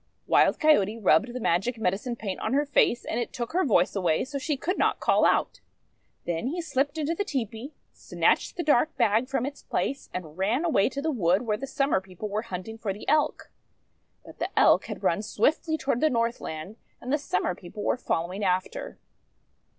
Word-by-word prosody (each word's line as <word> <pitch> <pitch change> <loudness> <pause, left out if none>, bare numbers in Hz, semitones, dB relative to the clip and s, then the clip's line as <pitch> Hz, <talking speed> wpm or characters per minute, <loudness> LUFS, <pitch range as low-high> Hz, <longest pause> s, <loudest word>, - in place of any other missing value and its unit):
Wild - - +3
Coyote 225 -9 +3
rubbed 220 +2 +3
the 250 - -5
magic 220 +4 0
medicine 220 +4 -1
paint 200 -5 -5
on - - -2
her 290 +2 +2
face, 275 -4 +2
and 230 - -2
it 240 - -3
took 240 +2 -5
her 370 +2 +2
voice 200 - +2
away 175 -2 +1
so 280 +1 -5
she 285 +1 -2
could 365 +8 -2
not - - +2
call - - +3
out. - - +1 0.7
Then 170 +6 -2
he 330 +6 -3
slipped 285 -2 -1
into 310 +1 0
the 375 - -1
tepee, 260 - -4 0.2
snatched - - 0
the 345 - -1
dark 300 0 +2
bag 230 +1 +2
from 260 -2 0
its 280 +1 -6
place, 275 - -3
and 170 -2 -7
ran 230 - +1
away 255 -12 +3
to 280 +1 -5
the 320 - +1
wood, 190 - +2
where 215 -3 0
the 275 +6 -6
Summer 275 -7 +1
People 190 +2 -8
were 210 +2 -1
hunting 220 0 -7
for 215 -3 -2
the 205 - -11
Elk. 305 +1 +1 0.7
But - - -14
the - - -1
Elk - - +5
had - - -7
run - - +2
swiftly 305 +9 0
toward 265 -5 -1
the 310 - +4
Northland, 230 - -3 0.2
and 255 +3 -4
the 300 - +2
Summer 180 -9 -1
People 180 +4 -9
were - - +2
following 185 -4 -2
after. 185 - -2
235 Hz, 200 wpm, -27 LUFS, 195-280 Hz, 0.7 s, Elk